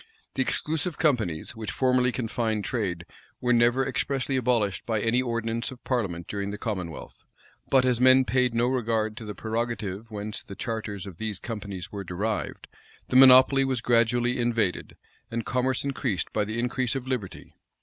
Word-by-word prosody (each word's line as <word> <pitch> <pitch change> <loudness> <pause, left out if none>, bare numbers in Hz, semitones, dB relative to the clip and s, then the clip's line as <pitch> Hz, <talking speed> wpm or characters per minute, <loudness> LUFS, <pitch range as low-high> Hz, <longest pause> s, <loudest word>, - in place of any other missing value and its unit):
The 135 - -1
exclusive 155 +4 -1
companies, 115 - 0
which 110 -2 -5
formerly 125 +2 +2
confined 110 -3 -2
trade, 90 -8 -2 0.3
were 125 0 +2
never 120 +3 +3
expressly 135 0 -1
abolished 115 -6 +1
by 110 -2 +1
any 115 +4 +2
ordinance 115 -1 -2
of 130 -1 -11
parliament 95 -10 -2
during 100 -1 -3
the 105 - -5
commonwealth; 95 -8 -5 0.5
but 130 -1 +4
as 125 -1 +1
men 130 0 +6
paid 125 -2 +1
no 120 +1 +3
regard 115 -4 0
to 115 - -7
the 105 -1 -6
prerogative 110 -2 -3
whence 105 0 -5
the 100 - -10
charters 105 -3 -4
of 95 -5 -9
these 110 -3 -2
companies 100 -5 -6
were 100 -1 -5
derived, 100 +5 -3 0.4
the - - -2
monopoly 130 +1 +8
was 130 -2 0
gradually 120 +1 +2
invaded, 115 -6 -1 0.3
and 115 -2 -3
commerce 130 +1 0
increased 130 - -2
by 105 - +1
the 110 +2 -4
increase 125 +2 0
of 130 -2 -3
liberty. 125 -8 -4
115 Hz, 165 wpm, -26 LUFS, 105-125 Hz, 0.5 s, monopoly